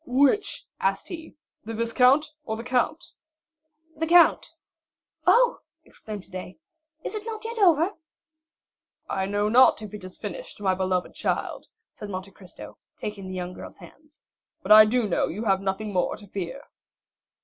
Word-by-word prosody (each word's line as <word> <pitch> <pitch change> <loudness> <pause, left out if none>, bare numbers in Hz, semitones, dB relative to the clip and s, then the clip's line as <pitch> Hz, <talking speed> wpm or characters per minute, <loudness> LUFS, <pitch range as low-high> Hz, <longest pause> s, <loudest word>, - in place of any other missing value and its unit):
"Which," 285 - +2
asked 195 0 -1
he, 325 -2 -8 0.3
"the 225 +1 -6
viscount 250 +6 +3
or 220 -5 -4
the 230 - -6
count?" 250 +7 -1 0.8
"The 325 +2 -2
count." 345 +1 +5 0.8
"Oh," 485 0 +5 0.3
exclaimed 210 -3 -9
Haydée, 185 -1 -9 0.5
"is - - -5
it 425 -1 -4
not 440 0 -6
yet 460 0 -4
over?" 345 -2 +4 1.2
"I 190 0 -2
know 205 +1 0
not 250 +2 +6
if 210 - -9
it 210 -2 -8
is 185 0 -10
finished, - - -7
my 190 -2 +1
beloved 185 -1 -1
child," - - -3 0.3
said 210 - -9
Monte 190 0 -6
Cristo, 185 -2 -13 0.2
taking 205 -2 -6
the 185 - -6
young 180 0 -4
girl's - - -10
hands; 305 0 -18 0.4
"but - - -3
I 215 0 +11
do 230 +1 +1
know 185 - +1
you 210 +7 -5
have 195 -2 +2
nothing 200 +2 -3
more 180 -1 0
to 210 - -14
fear." 195 +7 -6
215 Hz, 160 wpm, -25 LUFS, 195-305 Hz, 1.2 s, I